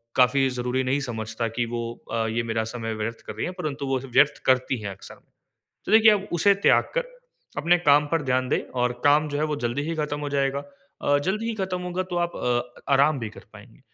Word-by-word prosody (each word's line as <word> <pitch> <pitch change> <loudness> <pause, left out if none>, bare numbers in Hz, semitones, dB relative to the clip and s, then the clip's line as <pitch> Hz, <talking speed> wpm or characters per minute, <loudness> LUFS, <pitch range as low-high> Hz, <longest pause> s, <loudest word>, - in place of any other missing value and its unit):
काफ़ी 135 +1 +4
ज़रूरी 125 +1 -1
नहीं 130 +2 +1
समझता 115 -2 -3
कि 120 - +2
वो 120 - -2 0.3
अ, 115 -1 0
ये 115 +1 -1
मेरा 115 -1 -1
समय 115 -2 -3
व्यर्थ 110 +2 -4
कर - - -5
रही - - -2
हैं, 180 - -4
परंतु 145 -2 -3
वो 135 -1 0
सब 135 -2 -11
व्यर्थ 150 +3 +5
करती 130 0 +2
है 105 - -4
अक्सर। 95 - -12 0.7
तो - - -2
देखिए, 220 0 +8
आप 205 -1 -1
उसे 200 +4 +4
त्याग - - +6
कर - - +1 0.5
अपने 170 +4 +3
काम 145 -3 +4
पर 165 - +2
ध्यान 130 -1 0
दें - - +1 0.2
और 125 0 +2
काम 150 +1 +4
जो 145 0 -3
है 150 - +1
वो - - -1
जल्दी 120 +4 -1
ही 165 +3 -3
ख़त्म 150 -1 -2
हो 145 - -3
जाएगा 140 0 0 0.4
अ, 145 - +3
जल्दी 195 +9 -2
ही 230 - -2
ख़त्म 190 -2 -2
होगा 180 +1 -2
तो 175 - -2
आप 175 - -5
अ, 120 0 -2
आराम 140 +2 +4
भी 115 -3 -4
कर - - -13
पाएँगीं। - - -15
140 Hz, 235 wpm, -25 LUFS, 120-155 Hz, 0.7 s, देखिए